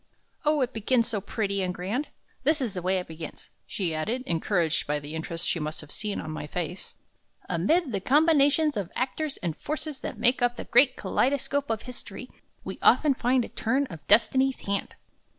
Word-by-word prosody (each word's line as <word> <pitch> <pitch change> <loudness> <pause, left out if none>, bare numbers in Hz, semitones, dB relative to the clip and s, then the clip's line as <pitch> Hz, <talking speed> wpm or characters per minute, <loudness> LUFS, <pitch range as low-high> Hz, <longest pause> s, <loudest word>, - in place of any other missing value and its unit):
O, 300 -1 +3
it 255 0 0
begins 230 +2 +1
so 215 -4 -1
pretty 200 -1 -1
and 180 -1 -1
so - - -13
grand! 215 +11 -2 0.4
This 305 +3 +3
is 240 -7 -2
the 180 - -4
way 185 +2 +1
it 180 - -3
begins," 160 -1 -9 0.2
she 180 -5 -2
added, 220 +12 -2
encouraged 170 -1 +1
by 150 0 +1
the 145 +1 -7
interest 165 +1 -3
she 170 - 0
must 155 +1 -3
have 150 -1 -9
seen 210 -1 -2
in 155 - -5
my 155 -1 -5
face: 175 +3 -5 0.5
"'Amid 255 - +1
the 200 - -1
combinations 295 - +4
of 195 -4 -3
actors 275 +4 -2
and 165 -3 -1
forces 305 - -4
that - - -5
make 245 +3 +3
up 245 0 +2
the - - -5
great 255 +1 +5
kaleidoscope 280 +1 0
of 225 -1 -1
history, 250 -1 -9 0.3
we - - -6
often 300 -3 +5
find 250 -1 +2
a - - -10
turn 260 +5 0
of 165 - -7
Destiny's 260 +5 +4
hand.'" 200 0 -2
225 Hz, 195 wpm, -27 LUFS, 180-270 Hz, 0.5 s, great